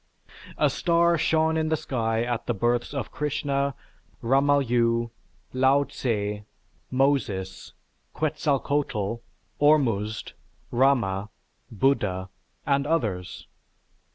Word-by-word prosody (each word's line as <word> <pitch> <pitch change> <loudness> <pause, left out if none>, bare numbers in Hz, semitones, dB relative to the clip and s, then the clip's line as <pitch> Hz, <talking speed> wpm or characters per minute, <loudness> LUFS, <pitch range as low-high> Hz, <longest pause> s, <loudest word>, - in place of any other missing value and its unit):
A - - +3
star 170 0 +3
shone 160 0 +2
in 160 0 0
the 160 - +1
sky 115 -5 -1
at 120 -1 -3
the 120 - 0
births 120 +3 0
of 140 -2 -4
Krishna, 140 -2 -1 0.5
Rama 140 +4 +3
Yu, 115 -1 +1 0.4
Lao 130 +2 +4
Tsze, 105 -6 -3 0.5
Moses, 120 -9 -1 0.4
Quetzalcoatl, 140 -7 -1 0.4
Ormuzd, 115 -8 +2 0.4
Rama, 115 -6 +2 0.4
Buddha, 105 -6 0 0.4
and 140 0 +1
others. 105 - -2
130 Hz, 95 wpm, -26 LUFS, 110-145 Hz, 0.5 s, Lao